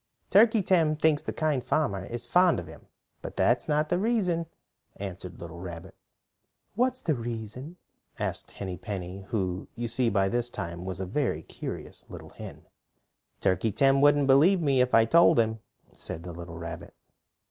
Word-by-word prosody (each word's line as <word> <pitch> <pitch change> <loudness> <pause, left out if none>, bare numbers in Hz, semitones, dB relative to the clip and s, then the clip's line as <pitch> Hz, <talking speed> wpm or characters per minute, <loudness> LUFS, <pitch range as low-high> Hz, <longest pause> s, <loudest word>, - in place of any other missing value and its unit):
"Turkey 220 0 +5
Tim 165 -5 +3
thinks 155 -1 +2
the - - -4
Kind 150 -5 0
Farmer 100 -12 0
is 120 +2 -5
fond 180 +7 +4
of - - -7
him, - - -13 0.3
but - - -8
that's 120 0 +2
not 150 +1 +1
the 175 - +1
reason," 185 -7 0 0.5
answered 90 -2 -7
the - - -15
little 85 0 -8
rabbit. 85 -2 -8 0.8
"What 250 +4 +2
is 255 - -9
the 160 - +1
reason?" 120 - -6 0.4
asked - - -3
Henny 95 -3 -6
Penny, 95 0 -6
who 95 -4 -2
you 120 0 -3
see 120 +1 +1
by 100 -2 +2
this 120 +3 -1
time 85 -4 -6
was 95 -2 -3
a 95 - -2
very 100 - -1
curious - - -7
little - - -10
hen. - - -10 0.8
"Turkey 95 +4 +1
Tim 135 +3 +3
wouldn't 145 0 +5
believe 150 +8 +5
me 140 -5 +2
if 125 0 +2
I 115 0 +6
told 170 +5 +5
him," 110 -1 +1 0.3
said 80 - -6
the 90 -1 -7
little 85 0 -8
rabbit. 85 0 -8
120 Hz, 175 wpm, -28 LUFS, 95-155 Hz, 0.8 s, I